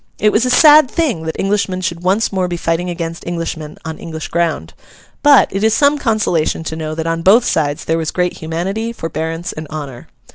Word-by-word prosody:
It 210 +1 +3
was 225 +4 +2
a - - 0
sad 300 +1 +7
thing 255 - -1
that 160 - -3
Englishmen 195 -2 0
should 170 -2 -3
once 195 +5 +1
more 185 -2 0
be 175 -1 -3
fighting 165 +2 -1
against 165 -1 -5
Englishmen 165 -3 -5
on 160 0 -6
English 160 -2 -7
ground; 160 - -1 0.5
but, 290 -1 +6
it 195 +2 -2
is 220 0 +3
some 290 0 +3
consolation 210 - 0
to 160 - -5
know 155 -1 -4
that 160 0 -4
on 165 0 -1
both 215 +8 +5
sides 145 -2 -1
there 165 +1 0
was 160 -1 -2
great 180 -1 -1
humanity, 190 +8 -3
forbearance, 165 -1 -4
and 155 0 -7
honour. 140 -5 -8
170 Hz, 205 wpm, -16 LUFS, 160-210 Hz, 0.5 s, sad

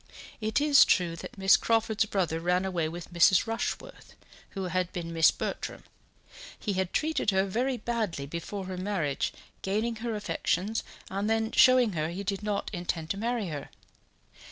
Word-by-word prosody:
It 215 +5 +1
is 290 -1 +7
true 175 -3 +2
that - - -9
Miss 195 0 +6
Crawford's 225 -1 +1
brother 180 -6 -1
ran 180 +2 +1
away 170 -4 -1
with 175 +1 -8
Mrs. 175 +2 +5
Rushworth, 225 0 -4 0.4
who 195 - -2
had 180 0 -1
been 170 -1 -5
Miss 165 -1 +6
Bertram. - - -4 0.7
He 205 - -2
had 190 -1 -1
treated 315 -8 0
her 190 -1 +3
very 245 +6 -1
badly 220 -13 -2
before 170 +6 -5
her 185 0 -5
marriage, 180 -7 -1 0.3
gaining 220 +4 -1
her 225 0 -3
affections 210 0 -1 0.3
and 200 +2 -1
then 225 0 +1
showing 255 -3 +6
her 155 -1 -1
he 185 +4 -5
did 195 +1 -2
not 205 -1 -2
intend 170 -3 -3
to 195 - -2
marry 230 -2 -1
her. 145 -2 -6
195 Hz, 165 wpm, -29 LUFS, 175-220 Hz, 0.7 s, is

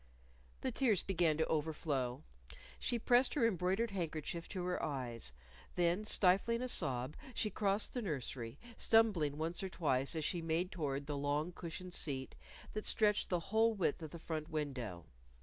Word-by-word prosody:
_ - - -29
The - - -1
tears 225 -9 +2
began 170 -5 +2
to 160 - +2
overflow. 145 -5 -1 0.6
She 240 - +1
pressed 245 +4 +4
her 265 -6 +3
embroidered 195 +2 +1
handkerchief 170 -2 -3
to 185 -2 -3
her 180 0 -1
eyes. 120 - -3 0.4
Then, 175 +4 +2
stifling 210 +4 +3
a - - -1
sob, 130 - +2 0.2
she 215 - 0
crossed 200 +1 +1
the 245 - -2
nursery, 135 - -4 0.2
stumbling 195 -11 +3
once 165 +3 -1
or 190 - -3
twice 140 -4 +2
as 155 -2 -1
she 175 +1 0
made 165 +3 0
toward 145 -4 -2
the 145 - -3
long 145 +4 0
cushioned 180 +1 -7
seat 135 -6 -1 0.4
that 215 - -4
stretched 210 -2 +2
the 180 - +1
whole 220 +6 +2
width 175 -5 0
of 160 - -5
the 170 - -8
front 160 -1 -4
window. 130 - -3
170 Hz, 165 wpm, -36 LUFS, 145-195 Hz, 0.6 s, pressed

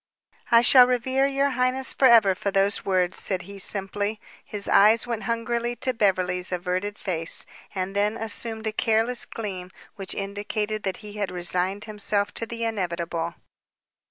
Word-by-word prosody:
"I 230 0 +6
shall 250 0 +8
revere 260 +2 +1
your 275 0 0
highness 255 +1 0
forever 230 -7 +5
for 200 - -3
those 195 +1 +3
words," 185 -2 0
said 185 -2 -2
he 200 +2 -10
simply. 205 +2 -3 0.2
His 205 -1 -3
eyes 220 +3 +5
went 235 -3 -4
hungrily 235 +1 -2
to 255 +1 -1
Beverly's 185 -4 0
averted 185 +3 -3
face, 165 -4 -2 0.3
and 190 +1 -3
then 210 +2 +1
assumed 225 0 -2
a 220 - 0
careless 225 +3 0
gleam 190 -5 -6 0.3
which 195 -2 -3
indicated 205 +2 -3
that 190 -2 -3
he 205 - -9
had 200 -2 -2
resigned 180 +2 -1
himself 205 -1 -1
to 230 - -3
the 230 0 -5
inevitable. 175 -6 -3
205 Hz, 155 wpm, -24 LUFS, 190-230 Hz, 0.3 s, shall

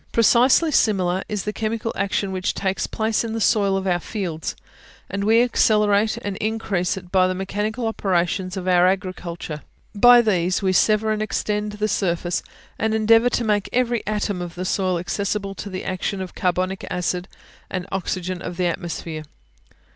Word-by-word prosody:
Precisely 250 +7 +4
similar 190 -7 +2
is 210 -3 -2
the 210 - -3
chemical 225 +1 -2
action 200 0 -1
which 185 -1 -2
takes 190 -1 -1
place 220 +1 0
in 225 -1 -4
the 225 - -2
soil 200 -3 +2
of 190 - -3
our 175 -2 +1
fields; 175 -5 -4 0.6
and 200 +1 -2
we 225 +3 +5
accelerate 210 -3 +3
and 200 -1 -3
increase 210 -5 -1
it 180 -2 -10
by 185 -1 +4
the 185 - -1
mechanical 210 +5 -3
operations 185 -3 -1
of 185 -1 -4
our 180 0 +5
agriculture. 180 -4 -3 0.3
By 245 +3 +7
these 185 -3 +1
we 190 -1 +2
sever 215 +3 +3
and 215 0 -1
extend 210 0 -2
the 210 0 -1
surface, 175 -3 -1 0.4
and 220 0 +1
endeavour 225 +2 +5
to 240 - 0
make 210 -3 0
every 240 -2 +1
atom 205 -3 -1
of 175 -1 -6
the 180 +1 -4
soil 185 -1 0
accessible 200 +3 -2
to 200 - -7
the 185 -1 -5
action 190 +1 -2
of 185 -1 -6
the - - -12
carbonic 185 +1 0
acid 180 0 -2 0.4
and 185 -2 -3
oxygen 185 -1 -3
of 175 - -6
the 180 - +1
atmosphere. 165 -2 -4
195 Hz, 175 wpm, -22 LUFS, 180-215 Hz, 0.6 s, By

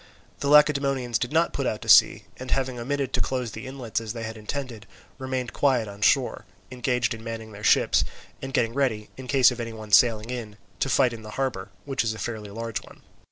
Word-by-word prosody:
The 140 - -2
Lacedaemonians 140 -5 +3
did 125 - -2
not 165 +2 +2
put 140 -2 -1
out 105 - -3
to - - -10
sea, - - +6
and 130 0 -8
having 130 -2 -1
omitted 135 +2 -2
to - - +1
close 125 -3 -2
the 130 - -8
inlets 130 -4 -4
as 110 -1 -5
they 115 -2 -6
had 110 0 -5
intended, 110 -1 -6 0.3
remained 130 -2 -3
quiet 130 -6 +2
on 100 0 -10
shore, - - +2 0.3
engaged 125 -2 0
in 115 0 -9
manning 115 -1 -6
their 105 0 -11
ships - - +4 0.4
and 135 - -5
getting 115 -3 +1
ready, 120 -6 -1
in 130 -1 -9
the - - -3
case 135 -3 +6
of 125 - -7
any 115 -1 -4
one 110 -1 -10
sailing 115 +1 +4
in, 110 -4 -6 0.2
to 135 - 0
fight 125 -1 +3
in 115 - -8
the 110 - -10
harbour, 125 -8 -2 0.2
which 135 -3 -1
is 110 -1 -1
a - - -9
fairly 110 -2 -5
large 115 +3 -4
one. - - -17
120 Hz, 225 wpm, -25 LUFS, 110-130 Hz, 0.4 s, sea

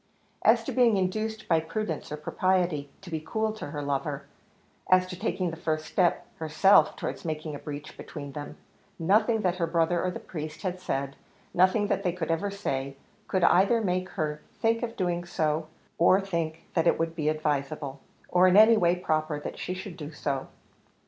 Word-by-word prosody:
As - - +5
to - - -4
being 240 -5 +4
induced 215 +4 -2
by 165 -2 +4
prudence 165 0 -4
or 150 - -3
propriety 175 -2 0
to 190 -3 -11
be 160 - -1
cool 220 +7 -1
to 220 - -7
her 145 -2 -5
lover 140 0 -2 0.6
as 185 0 +5
to 185 0 -7
taking 180 0 -1
the - - -6
first 155 -1 -2
step 175 -2 +1
herself 160 +2 +4
towards - - -5
making 155 -1 -4
a 145 - -6
breach 150 -1 -7
between 145 -2 -8
them 145 +1 -7 0.4
nothing 215 +6 +3
that 180 -2 0
her 170 -2 0
brother 170 +1 +1
or 185 - +1
the 180 - -5
priest 155 +1 -7
had 185 -1 -2
said, 140 -5 -3 0.4
nothing 185 +4 +4
that 200 - 0
they 180 -3 0
could 165 -2 -2
ever 165 +5 0
say, 140 -9 -3 0.3
could 185 -3 0
either 195 +7 +5
make 185 -3 -1
her 150 -1 -2
think 230 0 +1
of 235 -2 -3
doing 175 -2 -1
so, 155 -2 -1 0.3
or 185 +3 +6
think 170 -5 -3
that 165 -1 +2
it - - +4
could 165 0 -1
be 155 -2 0
advisable, 145 -2 -2 0.3
or 180 +1 +5
in 185 +2 +5
any 220 +1 +8
way 175 -3 +3
proper, 155 -3 -1
that - - -7
she 185 - -3
should 185 -1 -7
do 150 -2 -7
so. 140 -3 -3
170 Hz, 190 wpm, -28 LUFS, 155-185 Hz, 0.6 s, any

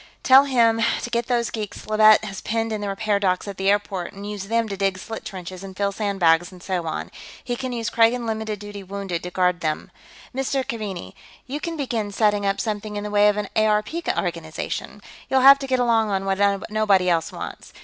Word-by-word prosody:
Tell 270 +1 +7
him 230 -4 +3 0.2
to - - -3
get 235 0 0
those 240 -2 0
geeks 215 -3 -6
Leavitt 215 0 +6
has 195 -2 -6
penned 225 0 -1
in 215 - -3
the 205 - -3
repair 200 +1 0
dock 185 0 0
at 200 - -6
the 195 +1 +1
airport 200 -3 -1
and 200 +1 -8
use 205 -2 -5
them 230 +2 0
to 200 - -4
dig 195 -1 0
slit 225 +4 -7
trenches 185 -1 -8
and 190 -1 -9
fill 200 0 0
sandbags 185 -5 +2
and 180 -1 -14
so 180 -3 -2
on. 160 - -4 0.3
He 245 - -2
can 255 +1 -4
use 230 -2 -3
Kragan 235 +1 +3
limited 220 -1 -3
duty 205 0 -8
wounded 195 -3 -4
to 180 - -6
guard 180 0 +1
them.... 155 -1 -2 0.4
Mr. 270 0 -1
Keaveney, 195 - -5 0.3
you'll 300 +5 -4
begin 235 -7 -2
setting 205 -1 +2
up 195 0 0
something 210 -1 -3
in 205 - -3
the 210 - -5
way 205 0 +5
of 210 - 0
an 210 -1 -2
ARP 215 -1 +2 0.3
organization. 165 -3 -4 0.3
You'll 265 -1 +3
have 275 +1 +9
to 270 - -5
get 260 -1 +1
along 230 -3 +2
on 195 -1 -1
what 195 0 0 0.3
nobody 205 -4 +3
else 165 -2 +1
wants. - - -8
210 Hz, 210 wpm, -23 LUFS, 195-225 Hz, 0.4 s, have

